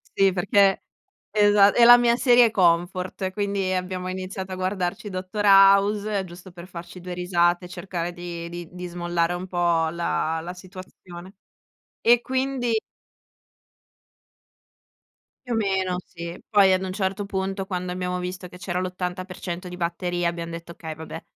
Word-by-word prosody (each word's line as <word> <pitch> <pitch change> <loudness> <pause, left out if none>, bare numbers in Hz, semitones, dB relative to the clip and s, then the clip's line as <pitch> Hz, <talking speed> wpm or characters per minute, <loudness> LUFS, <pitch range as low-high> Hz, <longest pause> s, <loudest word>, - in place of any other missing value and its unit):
Sì, 195 -1 +4
perché 195 +1 +3 0.5
esa 205 -1 +5
è 240 - +4
la 240 +1 +10
mia 235 -1 +3
serie 245 -2 +5
comfort, 180 +1 +1
quindi 200 -2 -1
abbiamo 185 0 -3
iniziato 190 0 -5
a - - -3
guardarci 185 +2 -3
Dottor 185 +3 -4
House 200 +1 +5
giusto 180 +1 -12
per 175 +1 -11
farci 175 0 -10
2 180 0 -6
risate, 175 0 +1
cercare 175 -1 -5
di 175 -1 -7
di 175 -1 -7
di 180 0 -7
smollare 175 0 -1
un 180 +1 -5
po' 170 -2 +1
la 165 -1 -1
la 175 +2 -6
situazione, 185 0 -12 0.7
e 240 0 +5
quindi 260 -2 -1 2.8
Più 235 - -1
o - - 0
meno, 190 -3 0
sì. 170 0 -8
Poi 195 -3 +5
ad 185 - +1
un 185 - -4
certo 195 +1 -2
punto, 195 0 -3
quando 180 -1 -4
abbiamo 180 0 -3
visto 180 0 -6
che 180 - -12
c'era 180 0 -3
l'80% 180 0 -5
di 180 - -8
batteria 175 0 -1
abbiam 170 -1 -4
detto: 170 +1 -8
"Okay, 160 -1 -7
vabbè 160 +1 -9
185 Hz, 150 wpm, -24 LUFS, 175-195 Hz, 2.8 s, la